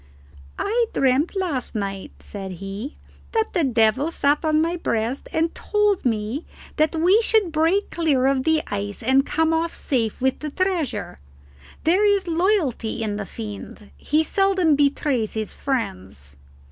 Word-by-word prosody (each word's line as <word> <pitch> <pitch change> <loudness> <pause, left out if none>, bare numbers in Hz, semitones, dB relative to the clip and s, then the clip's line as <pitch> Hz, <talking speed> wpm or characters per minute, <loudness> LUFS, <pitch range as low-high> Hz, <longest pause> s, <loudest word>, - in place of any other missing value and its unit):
"I 465 +3 +1
dreamt 270 +7 +2
last 325 -12 -2
night," 195 -2 -4
said 195 -2 -7
he, 195 - -7 0.4
"that 445 -1 0
the 345 - +2
devil 245 +3 +2
sat 290 -2 +1
on 310 -1 +2
my 335 +2 +1
breast 235 -5 -2
and 325 +1 0
told 420 -4 0
me 225 +5 -1 0.3
that 310 +2 +2
we 360 +7 +4
should 435 -6 +2
break 330 +6 +1
clear 295 -6 +1
of 270 -1 +2
the 320 0 +2
ice 205 +2 -4
and 265 +3 +4
come 320 +2 +1
off 330 +1 -1
safe 230 -6 -1
with 265 0 0
the 305 - -4
treasure 350 - -2 0.6
there 360 +6 +3
is 405 -2 +3
loyalty 320 - 0
in 205 -1 -2
the 205 -2 -5
Fiend. 210 -1 -8
He 305 +2 +1
seldom 380 -3 +2
betrays 280 -5 +1
his 215 -1 -3
friends." 95 - -4
285 Hz, 150 wpm, -23 LUFS, 225-340 Hz, 0.6 s, we